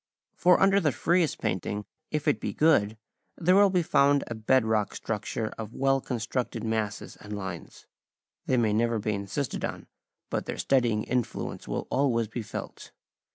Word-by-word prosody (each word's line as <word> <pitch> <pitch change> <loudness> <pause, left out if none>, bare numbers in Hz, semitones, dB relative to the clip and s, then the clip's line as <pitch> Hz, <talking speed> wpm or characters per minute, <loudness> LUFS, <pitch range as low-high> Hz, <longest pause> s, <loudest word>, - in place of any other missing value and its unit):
For 180 0 +4
under 195 +1 +5
the 155 -6 +2
freest 170 +3 +1
painting, 100 +3 -2 0.2
if 150 -1 -2
it 150 - +3
be - - -3
good, 115 -9 +3 0.4
there 180 +2 +3
will 200 0 +6
be 180 -2 +2
found 140 -2 +3
a - - -5
bed 115 +2 +2
rock 110 -2 0
structure 110 0 -3
of 110 0 -6
well 135 0 +2
constructed 125 +1 -3
masses 110 -2 -2
and 105 0 -7
lines. 95 -4 -7 0.6
They 130 - +2
may 110 -3 +2
never 115 +1 +1
be 105 0 -1
insisted 100 +7 -3
on, - - -4 0.5
but - - -2
their - - -4
steadying 120 -5 +2
influence 125 -2 -3
will - - -3
always 120 -5 +2
be 115 +3 -5
felt. 110 - -8
120 Hz, 165 wpm, -28 LUFS, 105-145 Hz, 0.6 s, will